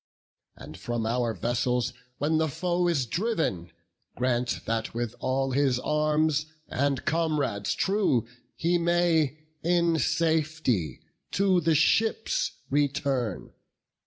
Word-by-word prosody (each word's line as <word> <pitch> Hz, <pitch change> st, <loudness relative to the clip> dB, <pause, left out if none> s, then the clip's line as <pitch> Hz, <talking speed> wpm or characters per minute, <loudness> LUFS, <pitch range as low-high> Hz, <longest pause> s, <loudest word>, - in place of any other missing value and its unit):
And -, -, -11 dB
from 120 Hz, -2 st, -2 dB
our 120 Hz, +1 st, 0 dB
vessels 120 Hz, +4 st, 0 dB, 0.2 s
when 155 Hz, +3 st, +1 dB
the 160 Hz, -, +2 dB
foe 175 Hz, +4 st, 0 dB
is 150 Hz, -7 st, +1 dB
driv'n, 160 Hz, -, -1 dB, 0.5 s
Grant 125 Hz, -1 st, 0 dB
that 115 Hz, 0 st, -2 dB
with 120 Hz, -1 st, -2 dB
all 135 Hz, +1 st, 0 dB
his 135 Hz, -1 st, +2 dB
arms 150 Hz, +2 st, +1 dB, 0.2 s
and 140 Hz, 0 st, -1 dB
comrades 150 Hz, -11 st, 0 dB
true 195 Hz, -, +1 dB, 0.3 s
He 175 Hz, +1 st, +1 dB
may 170 Hz, -4 st, +2 dB, 0.3 s
in 170 Hz, -1 st, +2 dB
safety 155 Hz, -, 0 dB, 0.3 s
to 190 Hz, -2 st, +3 dB
the 160 Hz, 0 st, +2 dB
ships 220 Hz, +8 st, +2 dB, 0.2 s
return." 135 Hz, -, -1 dB
145 Hz, 110 wpm, -27 LUFS, 125-165 Hz, 0.5 s, to